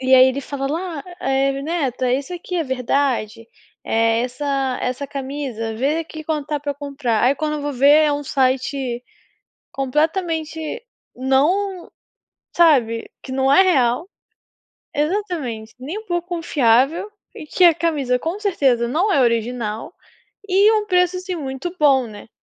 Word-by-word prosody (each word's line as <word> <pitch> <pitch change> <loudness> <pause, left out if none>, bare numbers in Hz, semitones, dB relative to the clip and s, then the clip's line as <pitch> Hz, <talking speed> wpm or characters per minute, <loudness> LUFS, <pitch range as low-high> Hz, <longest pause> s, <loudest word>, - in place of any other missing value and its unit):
E 260 0 +4
aí 260 0 +8
ele 260 +2 -2
fala: 275 0 -4
"La, 325 0 -3 0.2
eh, 270 +1 0
neta, 265 -6 -1
isso 280 +6 -2
aqui 355 +1 -5
é 330 - 0
verdade, 250 -4 -1 0.4
eh, 225 0 +2
essa 265 0 -2
essa 255 +3 -3
camisa, 265 -5 -4
vê 280 +7 0
aqui 315 -1 -6
quanto 300 -2 -2
tá 295 -1 -2
pra 285 -1 -3
comprar 275 -6 -2
aí", 265 +3 +4
quando 305 -1 -2
eu 295 - -4
vou 290 0 -2
ver 285 +4 +5
é 295 - +2
um 290 0 -2
site 260 -2 0 0.7
completamente, 315 +4 -1 0.6
não, 340 +9 +1 0.7
sabe, 250 -10 +3
que 260 - -8
não 265 +1 +2
é 290 - +7
real. 270 -4 +2 0.9
Exatamente, 300 - -2
nem 310 +12 -5
um 440 - -14
pouco 345 -3 -2
confiável, 310 - +2 0.2
e - - -8
que 365 - +1
a 340 - +7
camisa 300 -7 0
com 335 +9 -3
certeza 270 - +1
não 350 - +1
é 275 - +3
original 230 +1 -1 0.6
e 400 +4 +5
um 425 -1 +1
preço, 360 -1 +2
assim, 365 0 -4
muito 280 +4 -5
bom, 275 -4 +4
né. 210 -1 -11
280 Hz, 155 wpm, -20 LUFS, 255-330 Hz, 0.9 s, aí